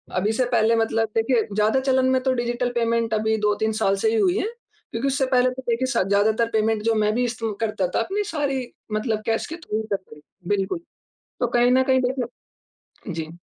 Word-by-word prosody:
अभी 195 +4 +1
से 255 +3 +1
पहले 225 +1 +3
मतलब 225 0 +1
देखिए 230 +1 +2
ज़्यादा 215 +4 +3
चलन 260 -1 +2
में 260 0 +2
तो 260 -1 +2
डिजिटल 240 0 -1
पेमेंट 230 -1 +1
अभी 220 0 +1
2-3 210 +1 +1
साल 195 -2 +3
से 220 - +4
ही 225 - 0
हुई 365 - +3
है - - 0 0.4
क्योंकि 230 +4 -1
उससे 270 0 +1
पहले 250 0 +4
तो 260 +1 -7
देखिए 235 +3 +1
स - - +2
ज़्यादातर 215 +3 +2
पेमेंट 220 0 +1
जो 230 0 +2
मैं 215 0 +2
भी 250 - +1
ईस्ट 240 -1 -5 0.2
करता 215 -4 0
था, 175 - -1
अपनी 390 - -1
सारी 275 -5 -1 0.3
मतलब 215 0 -1
कैश 225 0 0
के 325 - -6
थ्रू 220 -11 -3
करते 195 -5 -4
रहे 170 +4 -15
बिल्कुल। 195 - -2 0.6
तो 245 - +1
कहीं 240 +1 +3
न 260 +1 +4
कहीं 260 0 +3
देखें 250 -1 -3 0.7
जी। 160 -1 -4
230 Hz, 210 wpm, -23 LUFS, 215-255 Hz, 0.7 s, से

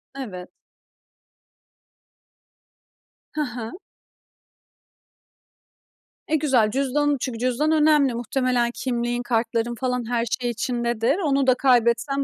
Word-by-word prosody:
Evet. 185 -9 -7 2.8
Hı 305 - -2
hı. 245 -5 -5 2.6
Eee, 315 - +2
güzel 260 -9 +2
cüzdan 280 +2 +1
çünkü 235 -4 -4
cüzdan 255 +5 0
önemli. 300 -4 +4
Muhtemelen 240 0 0
kimliğin, 240 -1 -2
kartların 230 0 -1
falan 250 -1 -2
her 235 -1 0 0.2
şey 245 - -1
içindedir. 235 - -1
Onu 275 -7 +1
da 255 - +5
kaybetsen 250 +2 +2
245 Hz, 95 wpm, -23 LUFS, 235-275 Hz, 2.8 s, da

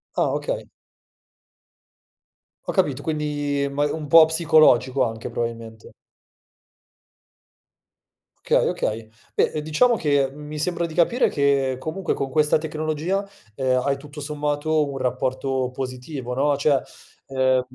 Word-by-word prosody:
Ah, - - +2
okay. - - -3 2.0
Ho - - -2
capito, 145 -8 0
quindi 145 -2 -1
ma 145 +1 -1
un 155 -2 -5
po' 165 +2 +8
psicologico 155 -6 +4
anche 115 -1 -4
probabilmente. 115 -1 -6 2.5
Okay. - - +2
Okay. 110 0 -2 0.3
Beh, - - +2
uhm, 150 - -1
diciamo 190 +11 +3
che, 145 -6 +1
mhmm, 150 +2 -11
mi 150 0 -6
sembra 170 +1 -1
di 160 - -7
capire 180 +10 +3
che 140 -3 +1
comunque 170 +5 -3
con 135 - -3
questa 150 +2 +3
tecnologia, 155 +5 -2 0.3
uhm, 130 -1 +1
hai 140 -1 +1
tutto 145 +1 -11
sommato 150 +1 -1
un 135 - -5
rapporto 130 0 -1
positivo, 125 0 -5
no, 140 +2 +1
cioè, 140 -2 +2 0.5
uhm, 130 -1 +2
145 Hz, 125 wpm, -23 LUFS, 130-155 Hz, 2.5 s, po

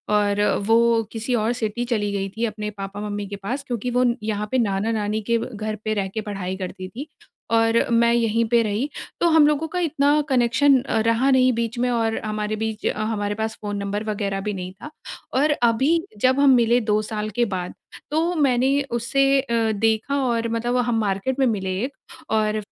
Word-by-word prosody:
और 205 0 +2 0.3
वो 230 0 +4
किसी 230 +2 -3
और 225 +1 +1
सिटी 230 0 -2
चली 215 -4 -1
गई 195 -1 -2
थी 230 +1 0
अपने 210 -1 -4
पापा-मम्मी 205 +1 -5
के 200 - -6
पास 235 +8 -4
क्योंकि 245 0 -3
वो 250 +1 +2
न 240 -1 +2
यहाँ 210 -1 -2
पे 260 - +2
नाना-नानी 215 0 0
के 235 - +4
व - - -3
घर 215 +1 -3
पे 215 - 0
रह 200 -2 -1
के 220 - -2
पढ़ाई 190 -2 -4
करती 185 0 -6
थी, 260 +10 -8 0.4
और 225 0 +3
मैं 235 0 +4
यहीं 230 -1 +2
पे 235 - +5
रही। 220 +6 -1 0.3
तो 345 - +3
हम 315 -2 +6
लोगों 300 +2 +1
का 360 +3 -3
इतना 295 -2 +2
कनेक्शन 255 +2 +4
अ, - - -1
रहा 230 +4 +2
नहीं 255 -1 +4
बीच 230 +1 -2
में 250 - +1
और 225 -2 0
हमारे 215 0 -2
बीच 220 0 -4
अ, - - -2
हमारे 205 -2 -2
पास 220 +1 -3
फ़ोन 205 -1 -3
नंबर 200 +1 -3
वगैरह 200 -2 -2
भी 210 +1 -3
नहीं 185 -1 -5
था। 205 +10 -10 0.4
और 295 +4 +3
अभी 240 +2 +2 0.3
जब 260 +1 +3
हम 280 -1 +5
मिले 240 0 +4
2 210 +1 +3
साल 215 0 -2
के 240 - +4
बाद, 185 -3 -4 0.4
तो 325 +3 +1
मैंने 265 -4 +2 0.2
उसे 270 +4 +2
अ, 230 -4 0
देखा 220 +5 0
और 230 -2 0
मतलब 235 +2 -1
हम 240 -2 +1
मार्केट 210 +6 -1
में 265 - +4
मिले 190 -4 -1 0.5
और 215 -1 +1
225 Hz, 200 wpm, -22 LUFS, 210-250 Hz, 0.5 s, हम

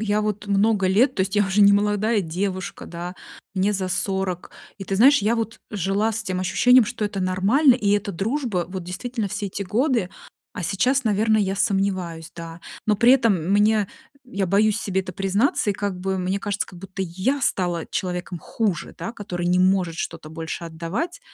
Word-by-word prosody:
я 210 -1 +1
вот 210 -1 -3
много 200 -1 +2
лет, 245 +8 +3
то - - -2
есть 190 +2 0
я 205 -1 +3
уже 195 +2 +1
не 200 0 +7
молодая 210 +2 +2
девушка, 185 +2 -4
да, 175 +1 -6 0.4
мне 195 +2 +1
за 190 -2 -2
40. 190 -1 -2 0.3
И 200 - -8
ты 195 0 -2
знаешь, 275 +6 +7
я 225 +3 +2
вот 225 0 -3
жила 205 +2 0
с 220 0 -4
тем 185 -1 -2
ощущением, 245 +6 +5
что 225 -1 -3
это 205 -1 -3
нормально 200 +10 +4
и 205 -5 0
это 205 0 +1
дружба, 210 - -1
вот 185 -1 -5
действительно 205 +5 -4
все 205 +1 -3
эти 200 +1 -4
годы. 230 -1 0 0.4
А 180 - -5
сейчас, 250 +9 +1
наверно, 220 +1 +2
я 195 -2 0
сомневаюсь, 185 -5 -1
да. 165 0 -8 0.2
Но 210 -1 +2
при 240 +4 +6
этом 230 -6 +4 0.2
мне 210 -1 +3 0.4
я 200 -6 -2
боюсь 210 +3 +3
себе 190 -1 -1
это 185 -1 -7
признаться, 200 - +1
и - - +1
как 200 -2 -3
бы, 190 +1 -2
мне 185 +2 -1
кажется, 205 0 -2
как 180 - -13
будто 190 +1 -6
я 190 +11 -1
стала 175 -8 0
человеком 180 -1 -4
хуже, 190 0 -2
да, 230 - -5
который 175 -5 -4
не 180 +1 +3
может 185 -2 +2
что-то 165 -1 -5
больше 160 +1 -6
отдавать. 175 - -4
195 Hz, 190 wpm, -23 LUFS, 185-215 Hz, 0.4 s, не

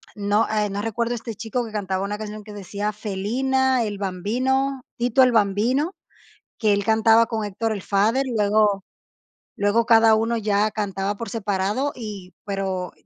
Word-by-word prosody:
No, 205 +1 +1
eh, 210 -1 0
no 200 +1 -3
recuerdo 230 +2 -1
este 230 -1 -6
chico 225 +4 -3
que 225 - -9
cantaba 195 -3 -2
una 205 +1 -3
canción 215 0 -7
que 210 0 -11
decía: 205 +1 -4
"Felina", 245 +6 0
El 205 -2 -3
Bambino, 255 +8 -1 0.2
Tito 245 +2 +2
El 255 - +4
Bambino, 230 - +2 0.7
que 215 -3 +2
él 200 0 0
cantaba 225 +2 +4
con 225 -2 -2
Héctor 220 +3 -2
el 205 - -3
Father, 215 +8 +1
y - - -4
luego 205 -2 +2 0.7
luego 210 +3 +2
cada 225 -1 +6
uno 225 +2 +1
ya 210 -1 +1
cantaba 205 -1 -2
por 230 +2 -6
separado 210 +5 -1
y 205 -6 -8
pero 190 -3 -3
215 Hz, 165 wpm, -23 LUFS, 200-230 Hz, 0.7 s, cada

